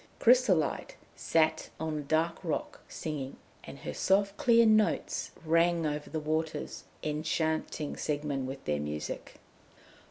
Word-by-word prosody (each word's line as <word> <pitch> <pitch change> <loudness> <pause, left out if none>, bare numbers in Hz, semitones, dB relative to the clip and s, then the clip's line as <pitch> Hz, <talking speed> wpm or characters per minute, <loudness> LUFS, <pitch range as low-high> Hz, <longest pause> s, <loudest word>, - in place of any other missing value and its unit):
Chrysolite 230 - +3 0.2
sat 160 -1 +1
on 160 -1 -2
a - - -3
dark 160 +4 +1
rock, 160 -4 -3
singing, 145 -4 -5 0.3
and - - -9
her - - -6
soft 200 +1 +2
clear 235 0 +5
notes 215 -1 +2 0.2
rang 165 +1 +3
over 150 0 -2
the 160 - -2
waters, 155 +1 -2 0.2
enchanting 155 0 -1
Siegmund 145 -3 -2
with 135 +1 -7
their 75 -1 0
music. 75 +1 -5
155 Hz, 125 wpm, -30 LUFS, 150-170 Hz, 0.3 s, clear